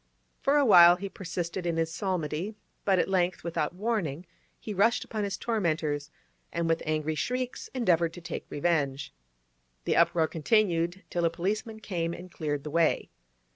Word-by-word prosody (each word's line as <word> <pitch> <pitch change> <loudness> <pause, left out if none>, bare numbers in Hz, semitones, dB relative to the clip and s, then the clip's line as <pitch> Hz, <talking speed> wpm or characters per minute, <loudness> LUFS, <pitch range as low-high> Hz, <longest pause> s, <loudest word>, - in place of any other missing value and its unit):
For 280 +2 +3
a 285 - +4
while 175 -5 +9
he 195 +2 -6
persisted 175 -1 -4
in 165 -1 0
his 165 0 0
psalmody, 180 +1 -2 0.3
but 195 -2 +4
at - - +2
length, 185 -1 0
without 170 -1 -2
warning, 185 -7 -2 0.3
he 215 - -5
rushed 220 +5 +3
upon 215 -2 -3
his 200 -1 -2
tormentors, 155 -9 -1 0.4
and 170 0 -1
with 165 0 +1
angry 155 0 0
shrieks 250 - -3
endeavoured 170 -9 +2
to 175 - -9
take 170 -1 -6
revenge. 145 -3 -1 0.7
The - - +1
uproar 170 -1 +4
continued 175 0 +1
till 175 - -1
a 165 - +4
policeman 215 +6 -3
came 170 -4 -2
and 180 +1 -11
cleared 145 -4 -3
the 150 - -6
way. 165 0 +1
175 Hz, 165 wpm, -28 LUFS, 160-200 Hz, 0.7 s, while